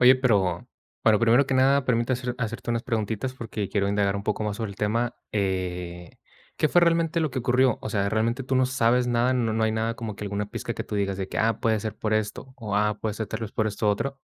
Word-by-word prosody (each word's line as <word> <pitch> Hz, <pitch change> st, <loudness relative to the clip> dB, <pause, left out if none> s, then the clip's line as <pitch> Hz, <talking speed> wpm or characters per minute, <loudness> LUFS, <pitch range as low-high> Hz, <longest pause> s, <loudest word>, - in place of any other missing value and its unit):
Oye, 125 Hz, +1 st, +8 dB
pero 105 Hz, -5 st, +1 dB, 0.4 s
pero 110 Hz, -2 st, +5 dB
primero 120 Hz, +4 st, +4 dB
que 135 Hz, -, 0 dB
nada, 135 Hz, +1 st, +4 dB
permite 120 Hz, 0 st, +1 dB
hacer 125 Hz, -1 st, -2 dB
hacerte 115 Hz, 0 st, -3 dB
unas 115 Hz, 0 st, 0 dB
preguntitas 115 Hz, +2 st, -2 dB
porque 110 Hz, -5 st, -4 dB
quiero 100 Hz, -1 st, 0 dB
indagar 100 Hz, -1 st, +1 dB
un 100 Hz, -, -4 dB
poco 105 Hz, +1 st, -1 dB
más 105 Hz, -1 st, -2 dB
sobre 110 Hz, -3 st, -3 dB
el 100 Hz, -, -11 dB
tema, 115 Hz, +3 st, 0 dB, 0.2 s
eh, 90 Hz, -3 st, -2 dB, 0.5 s
¿qué 155 Hz, -, +2 dB
fue 175 Hz, -, +5 dB
realmente 170 Hz, -1 st, +2 dB
lo 155 Hz, -, 0 dB
que 130 Hz, 0 st, -2 dB
ocurrió? 125 Hz, 0 st, +3 dB
O 110 Hz, -, -4 dB
sea, 100 Hz, -1 st, +1 dB
¿realmente 115 Hz, +4 st, 0 dB
tú 130 Hz, +1 st, -1 dB
no 130 Hz, 0 st, +4 dB
sabes 125 Hz, -1 st, +2 dB
nada, 120 Hz, +1 st, +2 dB
no 120 Hz, -3 st, +1 dB
no 110 Hz, 0 st, +1 dB
hay 110 Hz, -, +1 dB
nada 110 Hz, +1 st, -1 dB
como 115 Hz, -3 st, -5 dB
que 105 Hz, -, -7 dB
alguna 100 Hz, 0 st, -2 dB
pizca 115 Hz, 0 st, -4 dB
que -, -, -4 dB
tú -, -, -6 dB
digas 100 Hz, -1 st, 0 dB
de 95 Hz, -1 st, -4 dB
que: -, -, -4 dB
"Ah, 110 Hz, -1 st, +2 dB
puede 110 Hz, -1 st, +2 dB
ser 110 Hz, 0 st, -4 dB
por 110 Hz, -1 st, -1 dB
esto" 110 Hz, +4 st, -3 dB
o 105 Hz, -5 st, -3 dB
"Ah, 105 Hz, 0 st, +1 dB
puede 110 Hz, -2 st, -2 dB
ser 110 Hz, 0 st, -3 dB
tal -, -, -5 dB
vez 110 Hz, -, -4 dB
por 110 Hz, -, 0 dB
esto 105 Hz, 0 st, -1 dB
otro"? 135 Hz, +7 st, -1 dB
110 Hz, 255 wpm, -26 LUFS, 105-125 Hz, 0.5 s, Oye